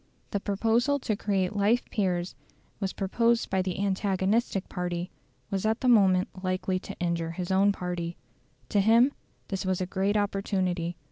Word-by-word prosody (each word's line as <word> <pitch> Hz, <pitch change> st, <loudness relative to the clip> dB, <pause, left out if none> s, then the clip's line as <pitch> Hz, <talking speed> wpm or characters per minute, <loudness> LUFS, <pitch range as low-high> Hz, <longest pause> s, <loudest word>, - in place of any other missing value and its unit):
The 200 Hz, -, 0 dB
proposal 225 Hz, +7 st, +1 dB
to 230 Hz, -6 st, -1 dB
create 195 Hz, -2 st, -1 dB
life 210 Hz, +4 st, +2 dB
peers 180 Hz, -4 st, 0 dB, 0.5 s
was 195 Hz, -2 st, -1 dB
proposed 230 Hz, +4 st, +1 dB
by 190 Hz, 0 st, +2 dB
the 185 Hz, 0 st, -3 dB
antagonistic 195 Hz, +1 st, 0 dB
party 175 Hz, 0 st, -3 dB, 0.4 s
was 195 Hz, -1 st, -1 dB
at 220 Hz, +2 st, 0 dB
the 260 Hz, -, +1 dB
moment 190 Hz, -6 st, +5 dB, 0.2 s
likely 185 Hz, 0 st, 0 dB
to -, -, -9 dB
injure 170 Hz, -1 st, -1 dB
his 180 Hz, +1 st, -4 dB
own 195 Hz, +2 st, +4 dB
party. 175 Hz, -3 st, -4 dB, 0.5 s
To 205 Hz, -, +2 dB
him 230 Hz, +6 st, +5 dB, 0.4 s
this 195 Hz, -2 st, -2 dB
was 185 Hz, -1 st, 0 dB
a 185 Hz, -, -1 dB
great 195 Hz, +3 st, 0 dB
opportunity. 185 Hz, -4 st, -1 dB
195 Hz, 155 wpm, -28 LUFS, 185-210 Hz, 0.5 s, moment